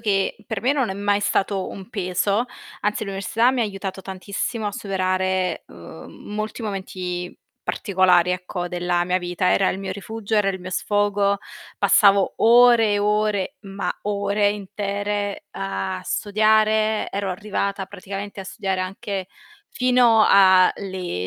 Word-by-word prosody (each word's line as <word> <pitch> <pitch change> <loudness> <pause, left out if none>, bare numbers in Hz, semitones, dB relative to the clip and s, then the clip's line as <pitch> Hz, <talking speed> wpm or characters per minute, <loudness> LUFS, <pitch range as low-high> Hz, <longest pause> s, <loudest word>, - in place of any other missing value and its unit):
che, 195 -3 0
per 220 -4 -3
me 255 +5 +2
non 265 -8 0
è - - -1
mai 205 +1 +1
stato 200 -1 0
un 195 0 -9
peso, 200 +1 0 0.4
anzi, 210 +1 -1
l'università 200 +5 +1
mi 260 -1 -1
ha 230 - +3
aiutato 195 -2 -5
tantissimo 200 +4 -4
a 205 - -2
superare, 185 -1 -1
uhm, - - -11 0.3
molti 215 +3 -4
momenti 185 -3 -5 0.3
particolari 180 -3 +2
ecco, 180 -1 -4
della 175 0 0
mia 180 +1 +1
vita. 175 0 0
Era 195 - +3
il 190 - -4
mio 195 - -5
rifugio, 220 +1 -5
era 210 -2 +3
il 190 -1 -6
mio 185 - -7
sfogo, 205 +1 +1 0.4
passavo 200 -2 +4
ore 235 -1 +6
e 205 - +2
ore, 210 +2 0
ma 195 -1 -4
ore 205 0 +1
intere 205 0 -3
a 95 0 -4
studiare, 215 +1 +2
ero 200 -1 -2
arrivata 200 0 -3
praticamente 200 +2 -7
a - - -7
studiare 190 0 -3
anche 190 0 -4 0.4
fino 245 -3 +4
a 190 -2 +6
le 185 - -4
200 Hz, 145 wpm, -22 LUFS, 185-210 Hz, 0.4 s, ore